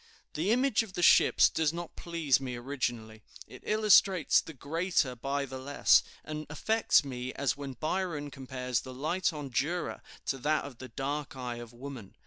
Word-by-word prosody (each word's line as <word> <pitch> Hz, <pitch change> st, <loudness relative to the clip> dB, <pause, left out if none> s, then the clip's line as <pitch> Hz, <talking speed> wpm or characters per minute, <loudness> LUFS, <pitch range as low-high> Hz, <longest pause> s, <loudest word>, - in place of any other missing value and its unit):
The 165 Hz, +6 st, -1 dB
image 250 Hz, 0 st, +3 dB
of 220 Hz, -4 st, -8 dB
the 175 Hz, -, -2 dB
ships -, -, +6 dB
does 155 Hz, -2 st, 0 dB
not 170 Hz, 0 st, -7 dB
please 165 Hz, -6 st, +1 dB
me 125 Hz, -2 st, -4 dB
originally. 120 Hz, -4 st, -4 dB, 0.2 s
It -, -, -13 dB
illustrates 200 Hz, -5 st, +4 dB
the 160 Hz, -, -11 dB
greater 160 Hz, -2 st, 0 dB
by 140 Hz, +3 st, -2 dB
the 130 Hz, 0 st, -7 dB
less, 140 Hz, +2 st, +4 dB, 0.2 s
and 155 Hz, 0 st, -6 dB
affects 220 Hz, +2 st, +2 dB
me 130 Hz, -1 st, -5 dB
as 140 Hz, -2 st, 0 dB
when 140 Hz, -2 st, -6 dB
Byron 155 Hz, 0 st, -2 dB
compares 125 Hz, -3 st, -3 dB
the 130 Hz, -1 st, -9 dB
light 165 Hz, +8 st, 0 dB
on 145 Hz, -4 st, -7 dB
Jura 165 Hz, +9 st, -1 dB, 0.2 s
to 135 Hz, -, -2 dB
that 155 Hz, +4 st, +1 dB
of 130 Hz, -4 st, -10 dB
the 130 Hz, -, -7 dB
dark 145 Hz, +1 st, -4 dB
eye 125 Hz, -2 st, -5 dB
of 120 Hz, -1 st, -9 dB
woman. 120 Hz, -4 st, -9 dB
140 Hz, 175 wpm, -30 LUFS, 130-165 Hz, 0.2 s, ships